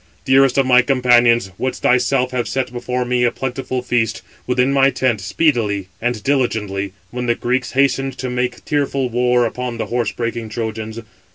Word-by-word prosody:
dearest 135 0 +4
of 135 - +4
my 125 -1 +6
companions, 120 -5 +3
wouldst 130 0 -3
thyself 125 0 +2
have 125 -2 -2
set 130 -2 -2
before 125 +1 -2
me 125 0 +1
a 120 - +4
plentiful 130 0 -4
feast, 115 -3 -1 0.2
within 125 +2 +2
my 135 0 +5
tent, 125 -6 0
speedily 105 - 0
and 120 -2 -2
diligently, 105 -8 -1 0.2
when 125 0 -4
the 120 - +2
Greeks 125 +1 -2
hastened 135 0 +1
to 130 - -4
make 125 0 -3
tearful 140 -3 0
war 125 0 +2
upon 125 +1 -4
the - - -2
horse 120 -1 0
breaking 115 -1 -4
Trojans. 110 0 -4
125 Hz, 170 wpm, -19 LUFS, 115-130 Hz, 0.2 s, my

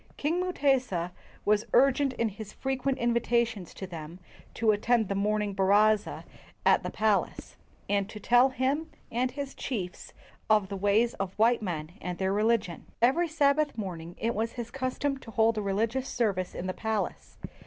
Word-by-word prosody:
King 320 +5 0
Mutesa 260 - +1 0.3
was 210 +1 +2
urgent 275 +1 +4
in 230 -2 0
his 210 0 -9
frequent 265 0 -1
invitations 235 -4 0
to 190 - -6
them 165 -2 -8 0.4
to 220 -1 +3
attend 220 +1 +1
the - - 0
morning 210 +1 0
baraza 205 +2 +3 0.4
at - - +5
the - - -4
palace, 215 -2 0 0.3
and 200 0 0
to 210 - -8
tell 245 +5 +5
him 275 +5 -1 0.2
and 250 +2 +1
his 280 +1 -6
chiefs 190 -9 -5 0.4
of 210 -3 +3
the 200 - -4
ways 205 +5 +2
of 195 -1 -2
white 230 +2 +4
men 165 -5 -4
and 180 -1 -4
their 190 0 0
religion. 210 -4 0
Every 270 +9 +3
Sabbath 300 -2 +2
morning 175 -5 -5
it 230 +1 -1
was 225 +2 -2
his 235 -1 -6
custom 270 +1 -2
to 240 - -12
hold 225 0 +2
a - - -1
religious 225 +6 -1
service 195 -6 -1
in 175 - -4
the 185 - -2
palace. 220 -1 -3
220 Hz, 165 wpm, -28 LUFS, 200-255 Hz, 0.4 s, at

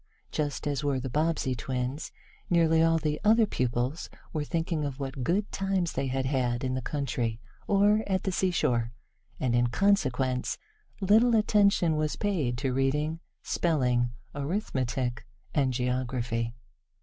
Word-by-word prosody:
Just 150 -1 -2
as 145 -1 -1
were 140 -2 +1
the 130 0 -5
Bobbsey 155 -2 +1
twins, 125 +3 -3 0.4
nearly 165 -2 +4
all 165 0 +4
the 150 -1 -2
other 220 +1 +5
pupils 125 - -2 0.2
were 155 -2 -1
thinking 165 0 -1
of 140 -1 -4
what 135 -1 -4
good 195 +9 0
times 195 -3 0
they 135 - -1
had 130 0 -1
had 125 -2 0
in 130 -1 -1
the 130 - -1
country, 120 -5 -2 0.3
or 205 +2 +4
at 190 -2 0
the 190 - 0
seashore, 125 -11 +1 0.5
and 125 -2 0
in 120 0 +3
consequence 130 - +1 0.4
little 220 +5 +5
attention 200 -6 +3
was 155 -1 0
paid 160 -13 -1
to 130 0 -1
reading, 150 +5 0 0.2
spelling, 125 -7 +1 0.2
arithmetic 130 - -2 0.3
and 135 -4 +2
geography. 125 -2 -1
140 Hz, 140 wpm, -28 LUFS, 125-170 Hz, 0.5 s, other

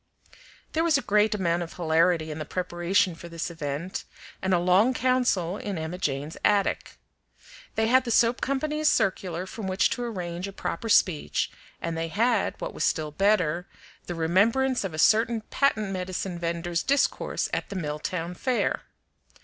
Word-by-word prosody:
There 320 - +2
was 330 -4 +4
a 275 - -3
great 210 0 +3
amount 175 -3 0
of 170 - -6
hilarity 165 -1 +2
in 155 - -6
the - - -2
preparation 180 +2 0
for 170 +1 -10
this 165 +1 -4
event, 155 +2 -4 0.4
and 190 - -1
a 180 - +5
long 185 +8 +3
council 240 -8 +1
in 200 -4 -4
Emma 160 +3 -4
Jane's 145 -1 -2
attic. 205 -1 +1 0.8
They 220 - +2
had 255 +3 +4
the 245 - -5
soap 235 +1 +3
company's 300 +3 0
circular 185 - +1
from 200 +1 -6
which 190 +1 +2
to 245 - -2
arrange 180 -5 -4
a 195 - -8
proper 180 +4 -4
speech, 180 -7 +2 0.3
and 165 -1 -3
they 165 0 -2
had, 225 +5 +1
what - - -5
was - - -3
still 155 -2 0
better, 180 -2 +1 0.4
the 175 - -4
remembrance 225 +11 +2
of 185 -5 -4
a - - -6
certain 225 +6 +3
patent 215 -7 +1
medicine 185 -1 -3
vender's 170 0 -1
discourse 280 +1 +1
at - - -2
the 200 - -6
Milltown 165 +1 -3
Fair. 250 +7 0
185 Hz, 165 wpm, -26 LUFS, 170-220 Hz, 0.8 s, a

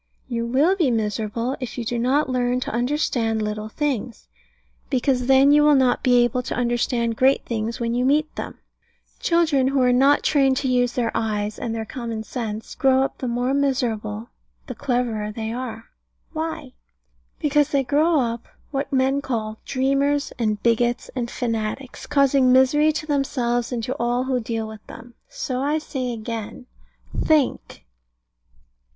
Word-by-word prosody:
You 235 -2 -2
will 290 +10 +3
be 335 -8 +2
miserable 225 +2 -1
if 255 -2 -6
you 240 - -3
do 240 +1 -2
not 270 +5 +2
learn 250 -1 0
to - - -3
understand 240 -3 0
little 215 0 -3
things: 255 -3 -3 0.6
because 255 -1 +1
then 270 +1 +6
you 295 +1 +6
will 295 0 +5
not 255 -2 +3
be 245 -1 +4
able 240 +1 0
to 250 - -4
understand 240 -1 0
great 265 +3 +3
things 225 0 -3
when 235 -1 -1
you 245 +1 +1
meet 300 +4 +1
them. - - -6 0.6
Children 320 -6 +2
who 275 0 +1
are 250 0 +4
not 275 +3 +4
trained 270 -3 +3
to 270 - -1
use 245 -1 +2
their 235 -2 0
eyes 210 -1 -2
and 230 -1 -3
their 220 -1 -3
common 230 -2 -5
sense 220 -2 -5
grow 265 -1 +3
up 270 - -4
the 255 - -3
more 245 +2 0
miserable 235 -6 -1 0.4
the 255 - -6
cleverer 240 -5 -1
they 220 +1 -4
are. 235 -2 -6 0.4
Why? 315 -4 -4 0.6
Because 295 -1 +2
they 280 -2 +1
grow 300 +5 +2
up 235 -1 -3 0.2
what 275 0 -3
men 270 +1 +2
call 220 -5 -3
dreamers, 275 +2 0
and 215 -3 0
bigots, 240 +1 +1
and 240 -2 -2
fanatics, 230 +2 -4
causing 275 -2 +3
misery 275 +4 +5
to 310 0 -4
themselves 250 -5 -1
and 235 -2 -2
to 250 - -3
all 240 +1 +1
who 260 -1 0
deal 225 -1 -3
with 220 -1 -10
them. 240 +1 -12 0.2
So - - -3
I 295 +3 +1
say 265 -5 -4
again, 230 0 -6 0.5
think. 305 -5 0
250 Hz, 165 wpm, -23 LUFS, 230-275 Hz, 0.6 s, then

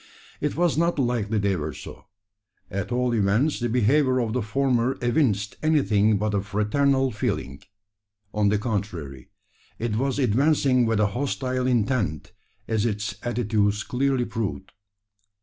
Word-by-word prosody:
It 150 0 -2
was 170 -3 +2
not 170 0 +1
likely 120 -5 0
they 100 -1 +1
were 75 -3 -4
so. - - -10 0.7
At 100 0 -3
all 125 0 +1
events 115 +8 +1
the 120 0 -1
behaviour 130 +3 +3
of 115 -3 -1
the 125 - 0
former 125 +2 0
evinced 120 -6 0
anything 110 -9 +3
but 105 +1 -1
a 100 - +1
fraternal 130 +7 +1
feeling. 70 - -3 0.7
On 105 -1 +2
the 105 - +2
contrary, 95 - -4 0.5
it 115 -2 -2
was 135 +2 0
advancing 130 0 +3
with 110 -2 +1
a 105 - +4
hostile 130 +3 -2
intent, 105 - 0 0.4
as 110 -2 0
its 105 -2 -2
attitudes 110 -3 0
clearly 130 -1 0
proved. 105 -4 -4
115 Hz, 140 wpm, -24 LUFS, 105-130 Hz, 0.7 s, a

